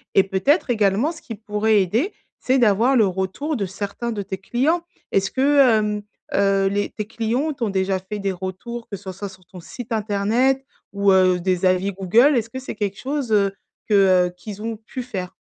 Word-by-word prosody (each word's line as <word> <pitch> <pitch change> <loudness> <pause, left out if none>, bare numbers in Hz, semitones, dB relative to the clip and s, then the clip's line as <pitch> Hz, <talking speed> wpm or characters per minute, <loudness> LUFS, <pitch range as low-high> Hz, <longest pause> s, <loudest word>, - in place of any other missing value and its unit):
et 195 - +7
peut-être 255 - +1
également 220 - +2
ce 325 - -12
qui 225 - -7
pourrait 210 0 +1
aider, 230 - 0 0.3
c'est 260 +1 +2
d'avoir 235 +2 +3
le 220 -5 +5
retour 190 - -2
de 205 - -1
certains 200 +5 -4
de 210 - -3
tes 190 -1 -5
clients. 265 - 0 0.3
Est-ce 195 0 +1
que, 280 +2 +3 0.2
hem, 210 -1 -1 0.3
heu, 195 -1 +3
les 205 +1 -1
tes 210 - -5
clients 235 +8 -1
t'ont 235 -5 -2
déjà 190 -1 0
fait 205 +3 -6
des 195 -1 -1
retours, 190 +6 -6
que 200 - -5
ce 190 0 -7
soit 195 +2 -6
sur 185 -1 -17
ton 180 - -12
site 240 +7 -9
internet 220 +6 +1 0.3
ou, 200 0 +3
heu, 185 -1 +4
des 185 0 0
avis 185 +2 +2
Google, 225 +10 +4
est-ce 230 0 -1
que 260 - -6
c'est 260 - -7
quelque 200 -2 -3
chose, 275 -3 -3
heu, 200 -2 +3 0.3
que, 215 - 0 0.3
heu, 175 - -9
qu'ils 210 +2 -9
ont 225 0 -4
pu 235 +4 -7
faire? 190 -7 -5
210 Hz, 200 wpm, -22 LUFS, 195-240 Hz, 0.3 s, et